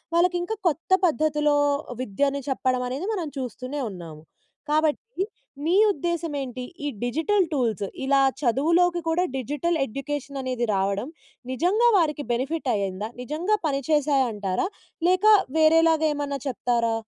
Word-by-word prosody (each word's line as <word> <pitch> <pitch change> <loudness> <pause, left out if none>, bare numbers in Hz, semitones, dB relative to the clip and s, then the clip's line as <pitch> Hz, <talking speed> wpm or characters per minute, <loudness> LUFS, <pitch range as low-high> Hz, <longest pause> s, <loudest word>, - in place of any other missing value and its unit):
వాళ్ళకి 355 +1 +3
ఇంకా 440 +5 -3
కొత్త 330 +3 -2
పద్ధతిలో 300 -2 +2 0.5
విద్యను 275 +5 -1
చెప్పడం 255 -1 0
అనేది, 280 +10 -4
మనం 360 -6 -2
చూస్తూనే 255 +3 -5
ఉన్నాము. 165 -5 -9 0.5
కాబట్టి 315 +8 0 0.4
మీ 335 - +2 0.2
ఉద్దేశ్యం 340 -2 -2
ఏంటి? 255 -1 -5 0.2
ఈ - - 0 0.2
డిజిటల్ 325 - +1
టూల్స్ 230 - 0 0.2
ఇలా 275 0 +4 0.2
చదువులోకి 335 +7 +2
కూడా 335 +2 +2
డిజిటల్ 295 +6 -1
ఎడ్యుకేషన్ 275 +2 -5
అనేది 255 -2 -1
రావడం 200 +4 0 0.4
నిజంగా 370 - +2
వారికి 300 -4 +1
బెనిఫిట్ 270 +6 -2
అయిందా? 200 0 -2
నిజంగా 325 - 0
పనిచేశాయ 280 0 +2
అంటారా? 195 - -1 0.4
లేక 370 +3 +2 0.3
వేరేలాగా 320 0 +5
ఏమన్నా 285 -1 -3
చెప్తారా? 235 -1 0
290 Hz, 125 wpm, -25 LUFS, 250-330 Hz, 0.5 s, వేరేలాగా